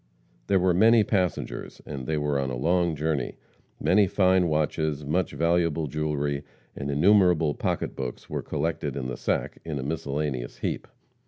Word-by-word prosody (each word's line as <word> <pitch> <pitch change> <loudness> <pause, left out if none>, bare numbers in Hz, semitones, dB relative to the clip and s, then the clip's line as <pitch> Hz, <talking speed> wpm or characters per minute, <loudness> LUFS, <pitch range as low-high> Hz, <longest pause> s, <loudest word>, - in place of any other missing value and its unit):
There 100 - +4
were 90 -1 +3
many 110 +4 +6
passengers, 95 -4 -2
and 65 -4 -6
they 80 - 0
were 75 -1 0
on 65 -1 -1
a 65 - -3
long 85 +4 +2
journey. 75 -4 -1 0.4
Many 100 +1 +4
fine 95 -1 +3
watches, 75 -1 0
much 85 +6 0
valuable 85 -1 +1
jewelry, 75 -1 -2 0.3
and 70 - -4
innumerable 85 0 +4
pocketbooks 65 -3 -3
were - - -3
collected 80 +1 -2
in 65 - -3
the 60 - -3
sack, - - -2
in 80 -3 -4
a 65 - -3
miscellaneous 70 -4 -3
heap. - - -3
75 Hz, 155 wpm, -26 LUFS, 70-90 Hz, 0.4 s, many